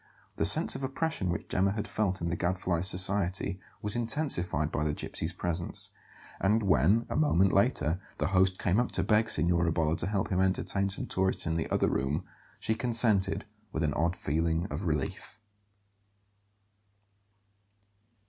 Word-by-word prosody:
The - - +1
sense - - +5
of - - -6
oppression 135 - -2
which 85 - -3
Gemma 95 +1 +1
had 105 0 -4
felt 100 -2 -1
in 85 - -2
the 85 - -1
Gadfly's 90 0 +1
society 95 0 +1 0.2
was 105 +1 0
intensified 115 - -1
by 75 - -1
the 75 -1 -1
gypsy's 80 +2 -3
presence; 85 -1 -1 0.5
and 105 +3 +2
when, 100 - +3
a - - -5
moment 95 - +3
later, 95 - +1 0.2
the 75 - -1
host 95 -1 +2
came 90 +5 +1
up 120 - -1
to - - 0
beg 110 +1 +2
Signora 85 +1 +2
Bolla 80 -1 0
to - - -1
help 100 -2 -1
him 95 0 +1
entertain 95 +1 0
some 95 - 0
tourists 95 0 0
in 80 0 -1
the 80 - -2
other - - +1
room, 70 +3 -1 0.4
she 110 - -1
consented 110 -4 +2 0.3
with 80 - -2
an 75 -2 0
odd 85 +3 0
feeling 80 +3 -1
of 75 +7 -4
relief. 75 -5 -3
95 Hz, 160 wpm, -29 LUFS, 85-105 Hz, 0.5 s, sense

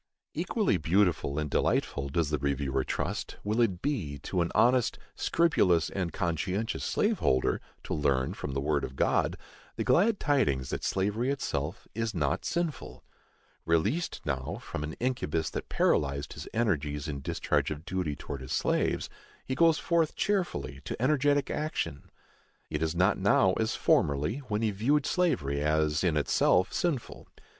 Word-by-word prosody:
Equally - - +1
beautiful 85 -4 +1
and 75 -1 -1
delightful, 70 -1 0
does 75 +1 0
the 75 - 0
reviewer 70 -1 0
trust, - - -3
will 110 +3 +1
it 95 -7 +1
be, 100 - -2
to 90 - -1
an 85 - -1
honest, 125 0 +3 0.2
scrupulous 95 - +2
and 90 -4 -2
conscientious 90 +8 -2
slave 215 0 +1
holder, 65 0 +1 0.2
to - - -4
learn, 70 -4 +1
from 70 - -5
the 70 - 0
word 70 0 0
of 65 - -5
God, - - +1 0.4
the - - -1
glad 205 +4 +3
tidings 105 - +1
that - - -3
slavery 105 +6 0
itself 85 - -3
is 115 -2 -2
not 75 -2 0
sinful. 170 -6 -3 0.6
Released 105 - 0
now 70 +5 -2
from 75 - -5
an 75 +1 -4
incubus 80 - -1
that - - -5
paralyzed 70 -1 +1
his - - -8
energies 75 -10 -1
in 70 -2 -4
discharge 85 +4 0
of 75 +1 -6
duty 90 -6 -2
towards 70 0 -7
his 65 - -5
slaves, - - +1 0.4
he 130 - -2
goes 165 +2 +4
forth 165 -2 +1
cheerfully 190 - -1
to - - -5
energetic 145 +2 +2
action. 150 - -3 0.6
It 75 0 -2
is 80 +1 0
not 95 +4 +3
now 95 -1 +4
as 110 0 0
formerly, 75 - +2
when 105 +1 -1
he 110 - +2
viewed 135 +9 +1
slavery 70 - +1
as 75 +1 +1
in 85 -4 +2
itself 75 +5 +3
sinful. 155 -9 -2
90 Hz, 155 wpm, -29 LUFS, -, 0.6 s, goes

